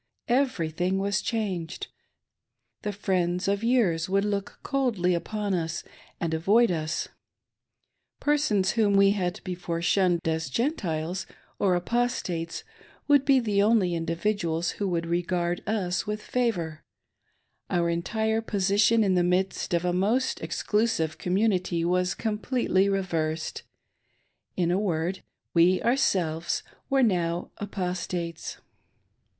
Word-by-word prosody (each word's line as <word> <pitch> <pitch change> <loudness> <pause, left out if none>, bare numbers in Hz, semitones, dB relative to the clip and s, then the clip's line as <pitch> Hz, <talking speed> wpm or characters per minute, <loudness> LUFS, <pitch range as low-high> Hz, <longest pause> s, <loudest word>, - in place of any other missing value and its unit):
Every 240 - +1
thing 180 +4 0
was 200 +1 0
changed: 190 -8 -3 1.0
the 210 - -2
friends 185 -2 0
of 200 +2 0
years 195 -9 +2
would 195 +1 +2
look 200 -1 -2
coldly 230 -11 +1
on 205 +3 -2
us 165 -2 -2 0.4
and 165 -1 -1
avoid 200 +8 +4
us; 160 -2 -2 1.1
persons 280 -11 +2
whom 215 -3 +2
we 195 0 +6
had 190 -1 -1
before 175 -2 -3
shunned 175 0 +2
as 160 -2 -1
Gentiles 180 - -2 0.3
or 190 -3 +3
Apostates 180 -5 -1 0.4
would 285 -2 +5
be 275 -2 +5
the 210 -4 +1
only 205 -4 +3
individuals 170 0 -1
who 200 - -3
would 170 -2 -1
regard 175 0 -1
us 195 -5 -1
with 210 0 -2
favor 180 -11 -1 0.5
;— - - -46
our 175 -2 +1
entire 220 +6 0
position 205 +1 +3
in 195 -2 +2
the 180 - +3
midst 185 +2 0
of 170 0 +1
a 175 - +1
most 225 +8 +1
ex - - -4
clusive 210 -8 +1
community 185 -3 +1
was 180 0 +1
completely 215 -3 +1
reversed; 165 -5 -1 1.0
in 175 -1 +2
a 185 - +2
word, 180 -1 -1 0.3
we 180 +2 +5
ourselves 175 -10 +1 0.3
were 270 -1 +3
now 175 -5 0
" - - -45
Apostates 180 -4 -4
185 Hz, 125 wpm, -27 LUFS, 170-210 Hz, 1.1 s, we